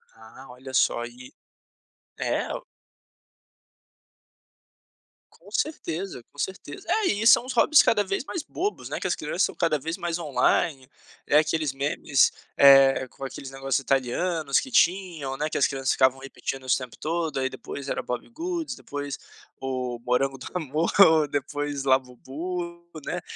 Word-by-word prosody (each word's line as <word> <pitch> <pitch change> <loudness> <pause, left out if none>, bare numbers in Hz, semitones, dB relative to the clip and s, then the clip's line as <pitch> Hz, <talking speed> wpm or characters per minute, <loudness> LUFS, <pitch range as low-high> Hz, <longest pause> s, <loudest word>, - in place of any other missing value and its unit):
Ah, 115 +4 -14
olha 130 +1 -11
só, 120 -2 +2
e 125 +1 -12 0.9
é - - -1
o - - -6 2.7
Com 180 +5 -18
certeza. 190 - -3
Com 145 - -16
certeza. 195 - -5
É, 435 - +2
e 210 +2 +1
são 235 - +7
os 255 - -4
hobbies 285 +5 +6
cada 210 -2 +3
vez 195 +4 -2
mais 320 +2 -5
bobos, 390 +6 -4
né, - - -3
que - - -2
as - - 0
crianças - - -3
estão - - 0
cada 165 -3 +1
vez 165 +4 -4
mais 170 -1 -2
online. 140 -3 +1 0.4
É, 145 - +5
aqueles 155 -2 +1
memes, 140 0 +2 0.2
eh, 135 -1 +7
com 135 - -12
aqueles 135 0 -7
negócio 135 -1 -1
italianos 140 +3 +1
que 265 - -7
tinham, 175 - +1
né, 150 +2 -1
que - - -2
as 140 - +4
crianças 135 -1 -1
ficavam 130 0 +3
repetindo 135 0 -6
isso 130 - +3
o - - 0
tempo 125 -2 -9
todo. 160 -2 -2
Aí, 130 0 0
depois, 140 +1 -7
era - - -1
Bobbie 125 - -5
Goods. 335 +4 -4
Depois 145 -1 -6 0.4
o 130 -2 -3
morango 135 +2 +1
do 130 - -9
amor. 155 -1 -1 0.4
Depois 145 0 -3
Labubu, 145 +7 -2 0.2
né. 180 - -3
145 Hz, 155 wpm, -26 LUFS, 135-175 Hz, 2.7 s, são